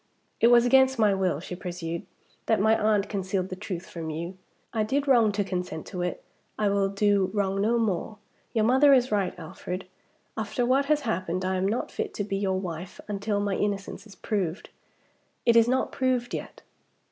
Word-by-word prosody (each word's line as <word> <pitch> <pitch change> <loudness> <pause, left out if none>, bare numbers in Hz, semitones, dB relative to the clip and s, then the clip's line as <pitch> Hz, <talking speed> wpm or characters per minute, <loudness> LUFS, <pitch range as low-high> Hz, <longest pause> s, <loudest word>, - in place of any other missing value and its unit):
"It 230 - +5
was 240 0 +6
against 265 +1 +5
my 210 -3 +4
will," 185 -6 0
she 180 +1 -7
pursued, 175 -2 -5 0.4
"that 220 - +3
my 220 +2 +4
aunt 210 -2 +2
concealed 190 -2 -2
the 185 - -4
truth 185 -2 -6
from 165 -2 -6
you. 170 +4 -5 0.4
I 220 - +1
did 275 +7 0
wrong 235 -5 +5
to 205 0 0
consent 180 -4 -4
to 180 - -5
it, 180 0 -3 0.3
I 210 -1 +2
will 200 -1 +2
do 200 -1 +2
wrong 195 -1 0
no 230 +3 +2
more. 215 -1 -1 0.3
Your 220 -2 +2
mother 265 +4 +6
is 255 -2 +3
right, 200 -3 0
Alfred. 180 +3 -6 0.5
After 220 +3 -1
what 265 +3 +3
has 300 +1 +2
happened, 185 -7 -2
I 190 0 0
am 185 +1 +1
not 220 +5 -2
fit - - -4
to 205 - -1
be 195 -1 -2
your 190 -1 0
wife 175 -1 -6
until 205 0 -1
my 205 -1 0
innocence 205 +1 -3
is 200 - -14
proved. 190 -4 -3 0.7
It 235 -1 +5
is 230 0 +6
not 260 +1 +1
proved 255 -2 0
yet." - - -6
200 Hz, 195 wpm, -27 LUFS, 185-230 Hz, 0.7 s, was